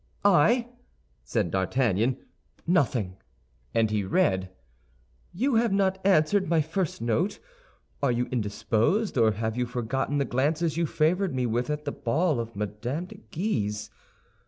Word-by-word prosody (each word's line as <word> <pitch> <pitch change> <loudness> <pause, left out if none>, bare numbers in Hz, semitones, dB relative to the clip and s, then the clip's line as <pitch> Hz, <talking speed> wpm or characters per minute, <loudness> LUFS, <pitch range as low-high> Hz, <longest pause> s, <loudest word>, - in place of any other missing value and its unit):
"I?" 205 +7 +4 0.6
said 105 -8 -1
D'Artagnan; 110 +4 +1 0.5
"nothing," 125 - +1 0.5
and 110 -2 +2
he 105 -1 0
read, 95 0 +1 0.8
"You 260 +9 0
have 230 -1 +2
not 190 -1 +1
answered 190 0 +3
my 165 -1 +3
first 160 - -2
note. 155 - 0 0.6
Are 140 -3 +2
you 120 +1 0
indisposed, 115 - 0
or 115 -4 +4
have 110 +2 -2
you 125 0 -1
forgotten 125 +4 -2
the 140 - +1
glances 150 +6 0
you 170 0 +1
favored 170 +2 +1
me 125 -1 0
with 120 +4 -1
at 150 0 -3
the 145 - -1
ball 150 +4 0
of 115 0 -5
Mme. 105 0 -4 0.3
de - - -13
Guise? 105 - -2
135 Hz, 140 wpm, -27 LUFS, 110-170 Hz, 0.8 s, I